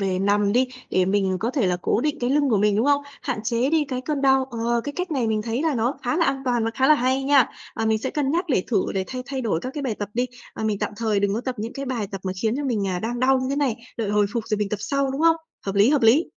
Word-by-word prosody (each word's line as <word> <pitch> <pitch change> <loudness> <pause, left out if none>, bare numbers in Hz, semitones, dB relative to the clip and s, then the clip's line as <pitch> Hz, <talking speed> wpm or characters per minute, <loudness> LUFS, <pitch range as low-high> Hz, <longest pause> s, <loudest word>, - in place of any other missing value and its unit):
về 190 -2 0
nằm 200 +1 +2
đi, 255 +3 +3 0.2
để 185 - +3
mình 190 -1 +1
có 230 +3 0
thể 260 -7 +1
là 180 -1 +1
cố - - +1
định 300 +2 -1
cái 245 - 0
lưng 285 0 +3
của 220 - +4
mình, 205 0 +2
đúng 230 +6 +2
không? 285 0 +3 0.2
Hạn 250 -5 -2
chế 240 +4 0
đi 315 -2 +3
cái 255 -2 -2
cơn 280 +1 -3
đau, 265 -1 +4
ờ, 235 0 0
cái 290 - -4
cách 360 -1 -3
này 260 -6 0
mình 215 -1 0
thấy 230 +5 -2
là 315 -4 +1
nó 240 +4 0
khá 245 +3 0
là 335 - +3
an 270 0 -1
toàn 240 -3 +1
và 225 - 0
khá 265 0 +2
là 305 - +8
hay 260 0 +1
nha. 275 -2 +4 0.3
À, 225 - -2
mình 220 0 +2
sẽ 260 - -3
cân 285 -3 -1
nhắc 345 +5 +1
để 190 -9 +1
thử 210 -6 +2
để 190 -1 0
thay 255 -1 -5
thay 270 0 -3
đổi 210 -9 0
các 255 - -4
cái 290 - -3
bài 250 -5 -1
tập 205 -1 -5
đi, 245 +2 +1 0.3
à, - - -4
mình 215 -2 0
tạm - - -2
thời 215 -3 0
đừng 200 0 +1
có 225 - -1
tập 255 0 -3
những 225 +2 -4
cái 275 - -5
bài 235 -5 -2
tập 195 - -4
mà 185 - -1
khiến 225 +2 +1
cho 290 - -3
mình, 220 -7 0
à, 180 -1 -1
đang 235 +3 -3
đau 265 +1 +4
như 255 - -2
thế 280 - -1
này, 275 -6 +1 0.2
đợi 210 -3 -1
hồi 210 -1 +3
phục 230 -2 -2
rồi 215 -1 -1
mình 210 - -1
tập 210 - -3
sau, 275 +3 0
đúng 270 +3 -3
không? 330 0 +5 0.3
Hợp 195 - -2
lý, 205 +5 +5
hợp 290 -3 +2
lý. 250 +10 +5
240 Hz, 325 wpm, -23 LUFS, 210-270 Hz, 0.3 s, là